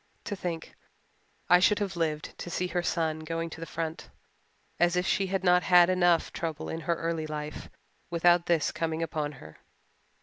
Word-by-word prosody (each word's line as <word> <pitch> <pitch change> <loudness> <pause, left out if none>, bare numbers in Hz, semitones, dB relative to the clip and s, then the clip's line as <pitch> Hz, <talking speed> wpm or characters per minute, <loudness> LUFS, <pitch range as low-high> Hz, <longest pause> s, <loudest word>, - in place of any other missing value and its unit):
To 205 - -4
think 170 -4 -5 0.7
I 180 +1 +7
should 205 +3 +4
have 195 -2 -2
lived 155 -2 -2
to - - -6
see 180 +1 -1
her 175 +1 0
son 160 -2 -1
going 165 +1 -4
to - - -9
the 165 - -6
front. 165 -1 -5 0.7
As 175 0 +3
if 180 +1 +1
she 195 0 +1
had 190 0 -1
not 180 -1 +5
had 180 0 +6
enough 175 -2 +2
trouble 160 -2 -4
in 160 - -4
her 170 - +3
early 165 -1 -2
life 150 0 -6 0.4
without 175 0 +3
this 170 -3 +2
coming 165 0 -2
upon 150 -2 -3
her! 80 - -13
170 Hz, 180 wpm, -28 LUFS, 160-180 Hz, 0.7 s, I